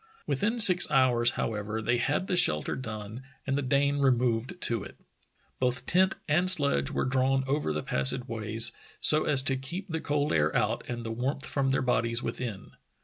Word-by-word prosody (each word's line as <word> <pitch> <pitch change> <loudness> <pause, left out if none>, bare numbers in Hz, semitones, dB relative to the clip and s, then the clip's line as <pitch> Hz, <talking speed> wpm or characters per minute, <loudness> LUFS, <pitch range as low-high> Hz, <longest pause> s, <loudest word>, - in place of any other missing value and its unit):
Within 225 +4 -1
six 180 -5 +7
hours, 125 -4 +3
however, 105 0 -3
they 120 +2 0
had 145 +9 -1
the 185 - -2
shelter 75 - +1
done 110 -1 -7 0.2
and 135 - -1
the 145 - -1
Dane 140 +1 0
removed 125 +3 0
to 115 -4 -1
it. 95 - -12 0.6
Both 125 0 -2
tent 185 +2 +2
and 175 +5 +1
sledge 140 - +1
were - - -2
drawn 135 0 0
over 140 - -2
the 75 0 -4
passageways 110 - +2 0.3
so 155 0 +6
as 140 -3 +3
to 135 -1 +1
keep 170 +9 -7
the 160 -1 -4
cold 145 0 -1
air 75 0 0
out - - -1
and 120 -1 -6
the 115 - -4
warmth 130 +5 -3
from 135 -2 -2
their 135 0 0
bodies 115 -1 -1
within. 110 -6 -6
130 Hz, 180 wpm, -27 LUFS, 115-145 Hz, 0.6 s, six